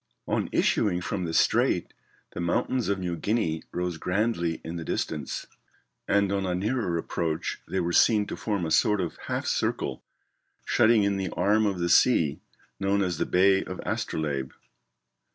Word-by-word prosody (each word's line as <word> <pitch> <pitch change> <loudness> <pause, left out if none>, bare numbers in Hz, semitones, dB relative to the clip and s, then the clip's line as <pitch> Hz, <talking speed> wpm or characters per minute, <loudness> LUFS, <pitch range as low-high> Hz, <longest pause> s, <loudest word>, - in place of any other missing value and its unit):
] - - -53
On - - -1
issuing 90 -4 +2
from 90 +1 -3
the 80 - -4
strait - - +2 0.4
the - - -6
mountains 105 +7 0
of 100 - +1
New 90 -2 -3
Guinea 85 -5 -1
rose 90 -1 -2
grandly 90 -3 -1
in 85 +1 -5
the 85 - -5
distance; 75 -3 -3 0.6
and 100 -1 +2
on 100 -1 0
a 90 -1 -1
nearer 105 -2 -1
approach 80 -1 -3
they 95 - -1
were 85 -1 -1
seen 105 +1 +4
to - - -5
form 100 -5 -2
a 80 - -3
sort 105 +4 +3
of 90 -3 -3
half - - -2
circle - - -1 0.6
shutting 110 -1 +4
in 100 0 +1
the 95 -1 -2
arm 105 +1 +2
of 100 -2 -1
the 85 0 -1
sea 85 - +4 0.4
known 100 +1 +1
as 90 -4 -2
the - - 0
Bay 95 +1 +4
of 95 - -7
Astrolabe. 70 -4 -2
95 Hz, 170 wpm, -27 LUFS, 85-100 Hz, 0.6 s, seen